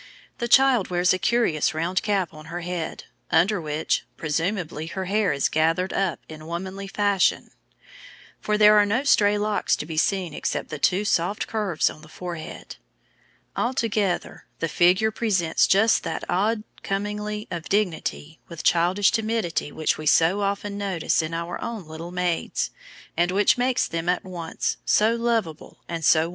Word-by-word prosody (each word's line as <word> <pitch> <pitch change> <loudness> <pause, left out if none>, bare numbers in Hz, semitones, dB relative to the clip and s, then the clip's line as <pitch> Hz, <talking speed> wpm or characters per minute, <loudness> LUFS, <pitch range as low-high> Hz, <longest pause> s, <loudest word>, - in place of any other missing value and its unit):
The 235 - -1
child 260 -4 +5
wears 180 +1 +3
a 185 - -1
curious 180 -12 +1
round 175 +4 0
cap 200 -4 -1
on 155 0 -12
her 170 +2 -6
head, 175 -2 -4 0.3
under 200 0 +3
which, 155 0 -1
presumably, 160 0 -2
her 190 +3 -4
hair 205 +1 +1
is 140 - +1
gathered 165 +4 +1
up 190 -4 0
in 155 0 -10
womanly 190 +3 -5
fashion, 200 -1 +1 0.9
for 210 0 0
there 210 0 +7
are 205 - +5
no 230 +7 +1
stray 210 -7 +4
locks 210 0 +1
to - - -6
be 160 0 -6
seen 180 -1 +1
except - - -3
the 155 - -6
two 190 +7 +2
soft 200 +2 0
curves 205 -7 0
on 155 - -5
the 155 - -14
forehead. 170 -2 -8 0.8
Altogether, 220 -7 -1
the 165 - -1
figure 185 +7 +3
presents 195 -8 +1
just 215 +4 +4
that - - -4
odd 210 +4 0 0.2
commingling 210 +1 -3
of 170 -1 -5
dignity 170 -5 -1
with 170 -2 -8
childish 180 +4 +3
timidity 220 -9 -1
which 155 +1 -1
we 155 - -4
so 165 +7 +4
often 200 0 -2
notice 190 -5 0
in 160 0 -4
our 170 +1 -4
own 225 -6 -5
little 160 +2 -8
maids, 180 -2 -1 0.4
and 175 +1 +2
which 200 +2 +3
makes 250 0 +1
them 165 +1 -3
at 180 - +1
once 175 -3 -3
so 220 +2 +3
lovable 230 -9 -2
and 165 -1 -4
so 155 +1 +5
womanly. 165 - -2
185 Hz, 165 wpm, -24 LUFS, 165-210 Hz, 0.9 s, there